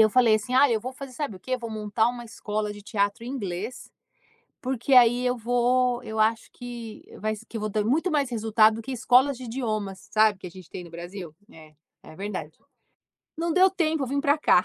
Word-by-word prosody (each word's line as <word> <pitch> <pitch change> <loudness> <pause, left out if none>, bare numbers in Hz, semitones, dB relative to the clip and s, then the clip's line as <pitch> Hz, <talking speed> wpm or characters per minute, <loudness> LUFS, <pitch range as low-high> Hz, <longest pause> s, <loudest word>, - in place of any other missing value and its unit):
Eu 215 -1 +6
falei, 235 -3 +5
assim: 215 +4 -1
“Ah, 280 +2 +6
eu 220 -2 +1
vou 255 +3 -5
fazer 270 0 -9
sabe 250 -7 -4
o - - -16
quê? 255 - -6
Eu - - -3
vou 230 -1 -5
montar 215 +1 0
uma 240 -1 -5
escola 210 -2 -3
de 205 0 -11
teatro 205 +1 -1
em - - -6
inglês, 215 -1 -5 0.7
porque 260 +1 0
aí 245 0 +6
eu 250 0 +1
vou 245 +1 +1
eu 220 -2 -6
acho 220 +1 +1
que 235 -3 -8
e - - -14
vai 215 0 -2
se 225 - -13
que 225 - -6
eu - - -5
vou 215 0 -2
ter 210 0 0
muito 320 - +1
mais 285 -4 +1
resultado 220 -1 +3
do 225 - -6
que 265 +3 -6
escolas 255 +2 +4
de 255 - -9
idiomas", 215 -6 -4
sabe, 215 -2 +4
que 185 - -9
a - - -7
gente 185 -1 -13
tem 180 - -6
no 170 - -12
Brasil? 175 -1 -8 0.2
É. 155 -1 -15 0.3
É 155 - -13
verdade. 190 -6 -6 0.8
Não 335 0 -1
deu 375 +2 +6
tempo, 320 -5 0
eu 260 - -2
vim 280 +2 -1
pra 285 +2 +3
cá. 180 -11 +4
230 Hz, 240 wpm, -26 LUFS, 210-255 Hz, 0.8 s, Eu